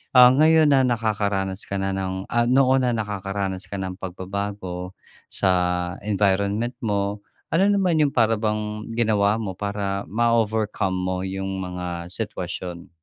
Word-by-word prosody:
ah, 125 0 +9
ngayon 155 +1 +5
na 135 - +5
nakakaranas 105 -5 0
ka 100 - -2
na 95 0 -1
ng, 95 0 -3
ah, 120 0 +2
noon 130 0 +4
na - - +2
nakakaranas 95 -3 -3
ka 100 - -4
ng 95 -1 -4
pagbabago 95 -1 -5 0.4
sa 95 - +1 0.5
environment 100 +3 +1
mo. 100 -1 -1 0.3
Ano 185 +4 +4
naman 185 -5 +2
yong 145 -2 +2
para 115 -2 +4
bang 105 0 -2
ginawa 105 -2 +2
mo 95 -3 -3
para 100 -1 -2
ma-overcome 110 -4 +1
mo 90 0 -1
yung 95 0 -3
mga 90 -1 -5
sitwasyon? 90 -4 -5
100 Hz, 140 wpm, -23 LUFS, 95-115 Hz, 0.5 s, ah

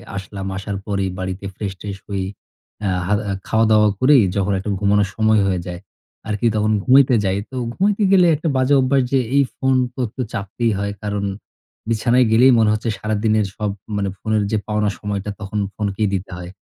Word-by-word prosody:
আসলাম, 95 0 -6
আসার 100 0 -4
পরেই 100 -2 -1
বাড়িতে 95 +1 -4
ফ্রেশ-ট্রেশ 100 0 -5
হয়ে 95 -2 -2 0.6
আ - - +1 0.2
হাদা 105 +1 +1 0.2
খাওয়া-দাওয়া 110 -1 +4
করেই 130 -2 +6
যখন 100 0 +1
একটা 95 - -5
ঘুমানোর 100 0 +2
সময় 110 -1 +3
হয়ে 95 -2 0
যায় 90 -1 -5 0.5
আরকি। 105 +1 -2
তখন 110 0 +1
ঘুমাইতে 130 0 +5
যাই। 95 0 +1
তো - - -8 0.2
ঘুমাইতে 205 - +1
গেলে 185 -2 +6
একটা 155 +3 -4
বাজে 130 +2 +2
অভ্যাস 135 +1 +2
যে 135 - +3 0.2
এই 140 - +6
ফোন 135 -1 +1 0.2
তো 130 - -12
একটু 110 - -6
চাপতেই 105 +4 -1
হয়। 100 0 -2
কারণ 105 -1 -2 0.6
বিছানায় 120 +2 +3
গেলেই 125 +4 +6
মনে 110 -1 +4
হচ্ছে 110 +2 -2
সারাদিনের 110 0 +1
সব 105 -2 -1 0.3
মানে 100 -1 -1
ফোনের 110 -1 0
যে 110 - +2
পাওনা 105 -1 +1
সময়টা, 105 -1 -3
তখন 105 +1 -3 0.2
ফোনকেই 105 0 -1
দিতে 95 +1 -5
হয়। 90 0 -8
105 Hz, 175 wpm, -20 LUFS, 100-115 Hz, 0.6 s, করেই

